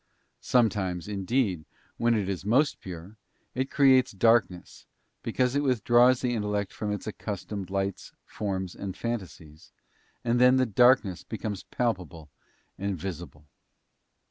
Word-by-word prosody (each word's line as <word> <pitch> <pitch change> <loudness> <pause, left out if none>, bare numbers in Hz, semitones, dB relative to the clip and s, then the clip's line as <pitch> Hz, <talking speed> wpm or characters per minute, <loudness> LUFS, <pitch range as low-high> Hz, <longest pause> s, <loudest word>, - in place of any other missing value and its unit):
Sometimes, 100 -8 +1
indeed 100 -3 -1 0.2
— - - -36
when 115 0 +3
it 105 -3 -1
is 95 -2 -3
most 130 +9 +2
pure 90 +3 -9 0.4
—it 130 +2 -2
creates 130 -4 +4
darkness, 100 -3 +1 0.3
because 125 +1 0
it 145 - +2
withdraws 125 -1 +4
the 125 -1 0
intellect 105 -3 -2
from 105 -1 -4
its 105 - -4
accustomed 100 -2 -5
lights, 95 0 -3
forms, 95 -3 -4
and 95 -1 -7
fantasies, 90 -9 -6 0.5
and 120 +1 +1
then 125 +1 +6
the 130 0 +3
darkness 110 -5 +3
becomes 105 -4 -5
palpable 90 -10 -3 0.5
and 100 -1 -2
visible. 85 -4 -7
105 Hz, 130 wpm, -27 LUFS, 95-120 Hz, 0.5 s, then